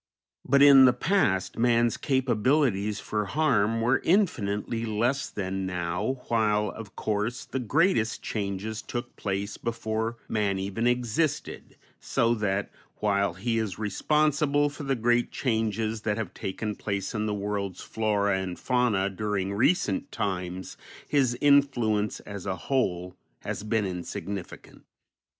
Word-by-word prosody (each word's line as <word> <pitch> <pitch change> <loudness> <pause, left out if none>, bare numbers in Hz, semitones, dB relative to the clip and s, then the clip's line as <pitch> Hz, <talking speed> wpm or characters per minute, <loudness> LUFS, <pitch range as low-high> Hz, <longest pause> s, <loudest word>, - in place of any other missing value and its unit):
But 140 +1 +4
in 135 -2 +9
the 125 - +6
past 125 - +1
man's 120 -1 +3
capabilities 125 -5 +1
for 105 -1 -2
harm 115 -5 +1
were 125 +3 +3
infinitely 115 - +1
less 120 +5 0
than 95 -1 -3
now, 90 +8 -2
while 105 -2 +2
of 110 -3 -10
course 110 +3 -2
the 135 - -3
greatest 125 - +1
changes 105 +1 -3
took 120 0 -6
place 100 +1 -3
before 115 0 -2
man 105 -3 0
even 100 +5 -1
existed, 125 +5 -1 0.2
so 115 0 +1
that, 105 -3 -1 0.2
while 100 -3 0
he 115 +4 -1
is 105 -5 -3
responsible 145 +6 +1
for 145 - -10
the 135 -1 0
great 120 +1 +1
changes 110 -2 -1
that 105 -1 -1
have 110 -6 -4
taken 105 +3 -4
place 100 0 -3
in 110 -1 -1
the 105 - -1
world's 100 -2 -3
flora 100 -3 0
and 90 -2 -4
fauna 125 -6 +1
during 100 0 -2
recent 185 - +1
times, 90 -2 -3 0.3
his 130 -4 +2
influence, 125 -7 +3
as 100 -2 -8
a 95 - -1
whole, 90 -9 -1 0.3
has - - -4
been 105 0 0
insignificant. 95 +1 -6
110 Hz, 130 wpm, -27 LUFS, 100-125 Hz, 0.3 s, in